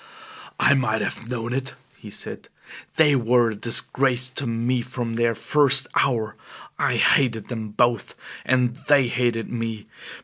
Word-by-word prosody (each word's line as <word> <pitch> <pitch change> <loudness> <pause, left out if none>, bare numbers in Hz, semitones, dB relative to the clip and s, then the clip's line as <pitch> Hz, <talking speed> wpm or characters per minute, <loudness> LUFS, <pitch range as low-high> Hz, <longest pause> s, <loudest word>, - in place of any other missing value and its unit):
"I - - +5
might 110 -5 0
have 115 - -5
known 120 -1 -4
it," 135 +1 -4 0.2
he - - -12
said. - - -8 0.5
"They 150 -3 +4
were 120 -1 +2
a - - -6
disgrace 125 +3 0
to 130 +1 -4
me 120 +2 -1
from 120 -1 -5
their 115 0 0
first 135 +2 +4
hour! 110 -5 0 0.4
I - - +1
hated 115 -6 +2
them 110 -3 -5
both; 120 0 0 0.3
and 125 -1 +1
they 140 -3 +4
hated 120 -2 -1
me! 115 -3 -4
120 Hz, 145 wpm, -23 LUFS, 115-130 Hz, 0.5 s, I